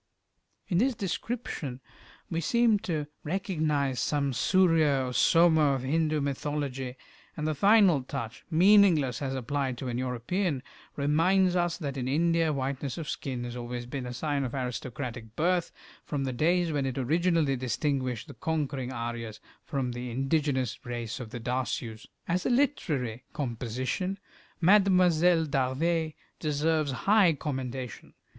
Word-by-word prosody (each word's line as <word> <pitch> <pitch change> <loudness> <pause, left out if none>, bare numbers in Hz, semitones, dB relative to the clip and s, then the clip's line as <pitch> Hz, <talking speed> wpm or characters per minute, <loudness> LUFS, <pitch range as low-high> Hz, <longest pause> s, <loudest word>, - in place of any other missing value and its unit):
In 175 -3 +1
this 255 +2 +2
description 195 - -4 0.5
we 165 -1 -2
seem 230 +4 +3
to 165 -8 -2 0.2
recognize 155 - -1
some 140 -2 0
Surya 160 -5 +3
or - - -6
Soma 160 +1 +4
of 130 - -4
Hindu 155 +2 +1
mythology, 140 -2 -3 0.4
and 150 - -2
the 155 - +1
final 195 -2 +5
touch, 125 -3 -6
meaningless 170 - +5
as 135 -1 -2
applied 130 0 -2
to 130 +1 -4
an 120 0 -2
European, 130 - -1 0.3
reminds 175 +6 +3
us 175 -1 +1
that 140 -5 -4
in 125 -1 -2
India 165 +3 +2
whiteness 135 0 -3
of 160 -3 -5
skin 130 -5 -4
has 120 0 -5
always 120 0 -5
been 125 +1 -5
a - - -5
sign 140 +3 -1
of 130 0 -4
aristocratic 125 -2 -5
birth, 175 +2 +1 0.3
from 145 -3 -3
the 130 -1 -2
days 170 +5 +2
when 140 -3 0
it 130 - -4
originally 160 +1 +2
distinguished 130 -1 -1
the - - -9
conquering 145 -5 -2
Aryas 115 -2 -5 0.2
from 135 -3 -2
the 120 +1 -5
indigenous 135 0 -1
race 120 0 -4
of 120 -3 -7
the 120 - -6
Dasyous. 120 -2 -3 0.2
As 180 +2 0
a - - 0
literary 150 - 0
composition 130 - -3 0.4
"Mlle. 195 +5 +7 0.7
D'Arvers" 155 +4 0 0.3
deserves 155 0 +1
high 200 -5 +5
commendation. 130 -5 -5
140 Hz, 140 wpm, -28 LUFS, 125-165 Hz, 0.7 s, Mlle